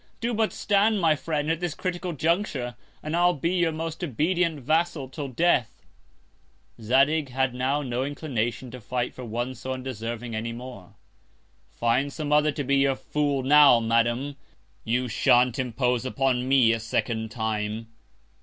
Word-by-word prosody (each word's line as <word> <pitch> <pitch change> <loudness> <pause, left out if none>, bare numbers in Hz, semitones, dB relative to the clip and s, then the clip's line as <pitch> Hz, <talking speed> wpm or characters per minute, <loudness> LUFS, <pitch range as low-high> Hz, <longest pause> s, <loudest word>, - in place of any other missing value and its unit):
Do 235 +1 -1
but 220 0 +1
stand 205 +1 +2
my 160 -4 +3
Friend, 150 0 -2
at 165 - -1
this 175 -3 -3
critical 180 0 -3
Conjuncture, 155 - -1 0.3
and 155 +2 -2
I'll 175 +1 +3
be 165 +4 -1
your 175 -3 +2
most 165 +2 -5
obedient 165 +3 0
Vassal 160 0 0
till 145 +1 -5
Death. 130 -4 0 1.0
Zadig 135 +6 +2
had 130 0 0
now 135 +4 0
no 125 -1 -2
Inclination 130 -4 -3
to 125 0 -9
fight 125 +2 -3
for 130 - -9
one 120 +2 -3
so 130 0 -5
undeserving 120 -2 -5
any 115 +1 -3
more. 120 -6 -10 0.7
Find 125 +5 0
some 150 0 -3
other 150 0 +4
to 145 - -4
be 140 +1 +2
your 135 -1 +3
Fool 145 -1 -1
now, 140 -2 +7
Madam; 120 +5 0 0.5
you 125 +3 0
shan't 125 +3 +3
impose 125 -1 0
upon 130 -1 0
me 130 -4 +5
a 115 - -1
second 110 0 -2
Time. 110 -1 -3
130 Hz, 155 wpm, -26 LUFS, 120-155 Hz, 1.0 s, now